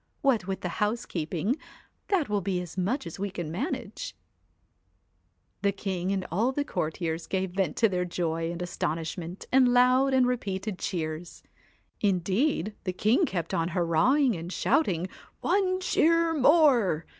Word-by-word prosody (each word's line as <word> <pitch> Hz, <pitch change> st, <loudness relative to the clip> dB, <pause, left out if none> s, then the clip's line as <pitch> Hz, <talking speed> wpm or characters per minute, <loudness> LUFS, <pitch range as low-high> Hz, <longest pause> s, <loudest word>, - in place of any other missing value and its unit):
What 240 Hz, -9 st, +2 dB
with 190 Hz, -1 st, -3 dB
the 180 Hz, +2 st, -4 dB
housekeeping 210 Hz, -, -1 dB, 0.5 s
that 365 Hz, -8 st, +1 dB
will 205 Hz, -1 st, 0 dB
be 185 Hz, -1 st, -1 dB
as 180 Hz, -2 st, -7 dB
much 195 Hz, +9 st, -1 dB
as 170 Hz, +2 st, -8 dB
we 200 Hz, +1 st, -1 dB
can 175 Hz, -4 st, -5 dB
manage.' 245 Hz, -, -4 dB, 1.5 s
The 200 Hz, -, +2 dB
king 190 Hz, -2 st, -3 dB
and 190 Hz, -2 st, -1 dB
all 220 Hz, +9 st, +2 dB
the 285 Hz, +2 st, -2 dB
courtiers 160 Hz, -, -3 dB
gave 190 Hz, -1 st, -1 dB
vent 185 Hz, -4 st, -1 dB
to 225 Hz, -, +5 dB
their 180 Hz, -3 st, -1 dB
joy 165 Hz, -2 st, -2 dB
and 175 Hz, +1 st, -4 dB
astonishment 170 Hz, +1 st, -4 dB
in 255 Hz, -2 st, +5 dB
loud 255 Hz, +2 st, +4 dB
and 255 Hz, -1 st, +5 dB
repeated 210 Hz, -5 st, -2 dB
cheers. 165 Hz, -1 st, -4 dB, 0.6 s
Indeed 200 Hz, -, +1 dB
the 185 Hz, -, -2 dB
king 230 Hz, -, +2 dB
kept 170 Hz, -3 st, -3 dB
on 165 Hz, 0 st, +1 dB
hurrahing! 220 Hz, -, +3 dB
and 170 Hz, +1 st, -6 dB
shouting 185 Hz, -, +1 dB, 0.3 s
One 370 Hz, -2 st, +1 dB
cheer 335 Hz, -2 st, +3 dB
more 265 Hz, -, +4 dB
195 Hz, 145 wpm, -28 LUFS, 175-255 Hz, 1.5 s, to